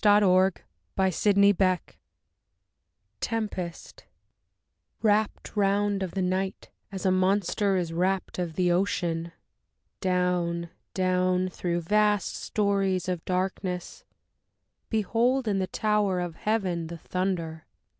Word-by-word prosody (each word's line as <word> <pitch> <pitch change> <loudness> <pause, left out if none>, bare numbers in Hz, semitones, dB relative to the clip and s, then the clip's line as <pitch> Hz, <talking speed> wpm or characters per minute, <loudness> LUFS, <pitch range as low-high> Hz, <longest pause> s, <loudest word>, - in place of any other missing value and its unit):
DITHYRAMBICS 185 - +2 0.3
I 185 -1 +4 1.4
Tempest 205 -7 -4 1.0
Wrapped 215 0 +1
round 200 0 +2
of 185 -2 -2
the 190 - 0
night, 185 +1 -2 0.2
as 195 0 -5
a 190 - +4
monster 195 +1 +2
is 170 -2 -2
wrapped 185 +2 -1
of 170 -3 -3
the 180 -1 +2
ocean, 170 -2 0 0.7
Down, 180 -2 0 0.2
down 185 0 +1
through 175 -1 -2
vast 210 +3 +2
storeys 195 -3 0
of 180 -3 -2
darkness, 185 -1 -3 0.9
behold, 235 +4 +1
in 200 -2 +1
the 185 - -1
tower 210 -3 +1
Of 175 -2 -3
the - - -22
heaven, 185 -6 -1
the 170 +1 -7
thunder! 165 -2 -3
185 Hz, 105 wpm, -27 LUFS, 175-200 Hz, 1.4 s, I